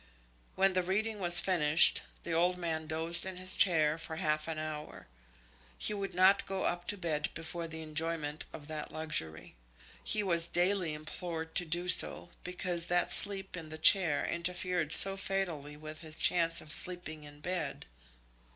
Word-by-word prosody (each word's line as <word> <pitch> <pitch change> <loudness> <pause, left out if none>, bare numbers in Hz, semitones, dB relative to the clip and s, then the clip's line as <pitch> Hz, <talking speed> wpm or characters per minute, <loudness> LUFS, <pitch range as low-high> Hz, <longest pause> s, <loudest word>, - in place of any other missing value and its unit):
When 195 0 +2
the 185 - +1
reading 210 +4 -2
was 175 -2 +6
finished, 160 -4 +5 0.2
the 170 - -5
old 175 +2 +1
man 160 -3 -4
dozed 165 +2 0
in 190 -1 -4
his 185 0 +2
chair 160 -4 +4
for 165 0 -7
half 155 0 -1
an 160 -1 -4
hour. 150 -12 -7 0.7
He - - -1
would 195 -3 -5
not 190 +2 +4
go 195 -1 -3
up 175 0 -2
to 205 - -1
bed 155 -5 -2
before 165 +1 -5
the 160 0 -6
enjoyment 155 -1 -3
of 145 - -10
that 155 -1 -6
luxury. 155 - -2 0.5
He 215 - -1
was 170 -3 0
daily 175 -3 0
implored 160 +1 -6
to 175 - +1
do 175 +2 -3
so, 180 - +1
because 180 -1 -2
that 175 0 +1
sleep 195 -2 -1
in 165 -3 -7
the 155 - -7
chair 165 -2 +5
interfered 175 -2 -2
so 195 0 +6
fatally 175 -7 -3
with 155 0 -9
his 160 -1 -5
chance 165 -1 +3
of 155 - -10
sleeping 165 -2 0
in 145 0 -13
bed. 165 -3 -4
170 Hz, 170 wpm, -31 LUFS, 155-180 Hz, 0.7 s, was